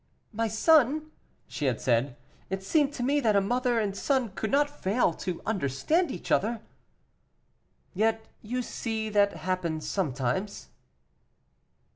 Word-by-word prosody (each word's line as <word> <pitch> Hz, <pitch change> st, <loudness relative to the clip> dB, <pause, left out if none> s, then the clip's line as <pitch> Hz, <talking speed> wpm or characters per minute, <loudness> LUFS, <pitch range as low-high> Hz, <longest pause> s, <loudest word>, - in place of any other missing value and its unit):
"My 225 Hz, +2 st, 0 dB
son," 305 Hz, +5 st, +3 dB, 0.4 s
she 150 Hz, -, -4 dB
had 125 Hz, -4 st, +1 dB
said, 120 Hz, +1 st, +1 dB, 0.3 s
"it 190 Hz, +1 st, -3 dB
seemed 290 Hz, +7 st, +2 dB
to 245 Hz, -, -4 dB
me 285 Hz, +3 st, +2 dB
that 220 Hz, -6 st, +2 dB
a -, -, +6 dB
mother 240 Hz, +4 st, +1 dB
and 200 Hz, -3 st, -1 dB
son 260 Hz, 0 st, 0 dB
could 215 Hz, +3 st, -4 dB
not 290 Hz, +1 st, +3 dB
fail 220 Hz, -, 0 dB
to 175 Hz, +1 st, -5 dB
understand 220 Hz, -, 0 dB
each 175 Hz, -, -6 dB
other." 225 Hz, +2 st, +1 dB, 1.3 s
"Yet 220 Hz, +3 st, +1 dB, 0.2 s
you 250 Hz, +3 st, -3 dB
see 220 Hz, -2 st, -3 dB
that 205 Hz, -1 st, +3 dB
happens 170 Hz, -4 st, -3 dB
sometimes." 150 Hz, +3 st, -2 dB
215 Hz, 135 wpm, -28 LUFS, 185-250 Hz, 1.3 s, a